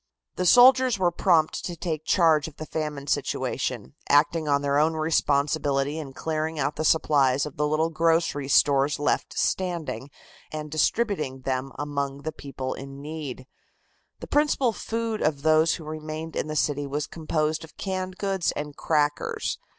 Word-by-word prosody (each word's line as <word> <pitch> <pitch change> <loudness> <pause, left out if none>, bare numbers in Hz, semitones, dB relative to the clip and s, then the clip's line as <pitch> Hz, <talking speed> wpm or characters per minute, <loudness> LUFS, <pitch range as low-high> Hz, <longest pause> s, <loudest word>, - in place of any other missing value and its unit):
The 180 - 0
soldiers 255 +2 +6
were 180 -2 +2
prompt 170 -3 +2
to 175 - -4
take 160 -2 -4
charge 160 -4 +3
of 155 - -11
the 155 - -6
famine 150 -3 -4
situation, 65 - -2 0.2
acting 150 +2 +3
on 140 0 +2
their 140 0 +2
own 160 +2 +2
responsibility 145 -2 +1
in 140 -4 -7
clearing 160 +2 -3
out 145 0 -1
the - - -2
supplies 140 -4 +3
of 150 - -8
the 150 +1 0
little 155 +2 +1
grocery 165 -3 +1
stores 140 +1 +3
left 145 - -1
standing 170 -7 -2 0.4
and 150 -1 -6
distributing 155 - 0
them 130 +1 -2
among 140 -1 -3
the 155 - -3
people 135 -2 -5
in 135 0 -9
need. 145 -4 -6 0.8
The - - -5
principal 290 -5 +2
food 225 0 -3
of 145 -2 0
those 160 +1 +4
who 165 - -9
remained 155 +1 -6
in - - -2
the 155 - -4
city 145 -1 0
was 145 +1 -2
composed 155 -1 -2
of 160 - -14
canned 185 -1 -4
goods 190 -4 0
and 145 -1 -5
crackers. 150 -2 -1
155 Hz, 160 wpm, -25 LUFS, 145-165 Hz, 0.8 s, soldiers